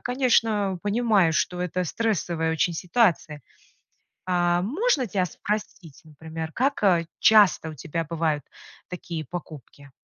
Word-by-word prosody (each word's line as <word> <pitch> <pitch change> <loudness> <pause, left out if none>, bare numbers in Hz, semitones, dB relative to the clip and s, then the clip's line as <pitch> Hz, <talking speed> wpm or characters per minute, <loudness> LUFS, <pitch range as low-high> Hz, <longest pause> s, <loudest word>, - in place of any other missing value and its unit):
конечно, 225 -7 +1
понимаю, 205 -5 +2
что 180 +2 -1
это 180 0 -2
стрессовая 170 -5 -1
очень 160 +2 0
ситуация. 175 -5 0 0.9
А, 175 -1 +2
можно 295 - 0
тебя 190 -2 0
спросить, 180 -4 -5
например, 160 +1 -8
как, 275 - -1
э, 175 -5 +3
часто 205 -7 +5
у - - -9
тебя 165 +3 -4
бывают 155 -3 -2 0.4
такие 170 -3 -6
покупки? 145 -3 -10
180 Hz, 120 wpm, -25 LUFS, 160-210 Hz, 0.9 s, часто